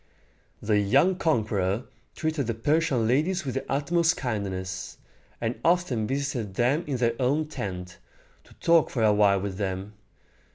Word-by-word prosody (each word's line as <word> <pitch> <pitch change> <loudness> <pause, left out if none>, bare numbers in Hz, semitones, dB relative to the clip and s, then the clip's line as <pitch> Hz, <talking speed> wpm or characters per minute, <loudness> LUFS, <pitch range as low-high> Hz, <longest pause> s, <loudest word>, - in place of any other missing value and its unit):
The 105 -1 +2
young 140 - +3
conqueror 110 - 0 0.3
treated 155 -5 -1
the 115 - -1
Persian 135 -2 +1
ladies 160 +8 +1
with 130 - -2
the 135 - -4
utmost 165 +5 +2
kindness, 95 -6 -4 0.4
and 115 +1 -3
often 165 -11 +1
visited 130 -7 -3
them 130 - +2
in 135 -3 -1
their 115 -1 +1
own 140 +5 +1
tent, 90 - -6 0.5
to - - -19
talk 165 -2 +3
for 115 - -1
a 105 -1 +5
while 100 -2 +4
with 95 -1 -4
them. 95 0 -3
120 Hz, 150 wpm, -26 LUFS, 100-150 Hz, 0.5 s, a